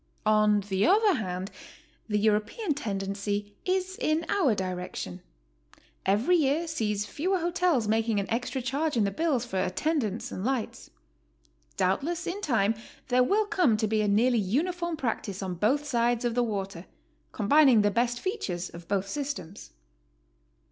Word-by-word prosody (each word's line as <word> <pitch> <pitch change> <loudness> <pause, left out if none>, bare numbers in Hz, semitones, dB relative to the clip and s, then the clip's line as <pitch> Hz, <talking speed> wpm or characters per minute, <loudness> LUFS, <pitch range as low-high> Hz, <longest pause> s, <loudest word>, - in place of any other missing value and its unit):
On 215 -1 +4
the 195 0 -1
other 410 +2 +5
hand, 185 - -3 0.6
the 210 - +1
European 215 - +1
tendency 205 -3 -3
is 375 0 -1
in 310 +2 +1
our 285 - +2
di 185 -2 -2
rection. 180 - -6 0.9
Every 215 - +3
year 310 +2 +1
sees 210 -9 -1
fewer 370 - -1
hotels 345 - +1
making 220 0 +1
an 200 - -3
extra 245 +3 -2
charge 280 +2 -1
in 220 - +3
the 200 - 0
bills 280 -2 0
for 190 -6 -2
attendance 235 - -1
and 185 - -5
lights. 255 -2 -3 0.9
Doubtless 320 - 0
in 390 +4 -4
time 225 - +2 0.4
there 250 0 +4
will 420 +10 +2
come 340 - +2
to 220 - 0
be 215 0 +1
a 210 - +1
nearly 230 +4 +3
uniform 335 - -1
practice 205 -7 -3
on 185 -1 -3
both 255 - +1
sides 240 -3 +1
of 240 - 0
the 245 - +2
water, 195 -5 -4 0.4
combining 245 +1 +5
the 205 - +3
best 240 +2 0
features 195 - -3
of 170 0 -11
both 200 -1 0
systems. 270 - -5
230 Hz, 155 wpm, -28 LUFS, 200-305 Hz, 0.9 s, other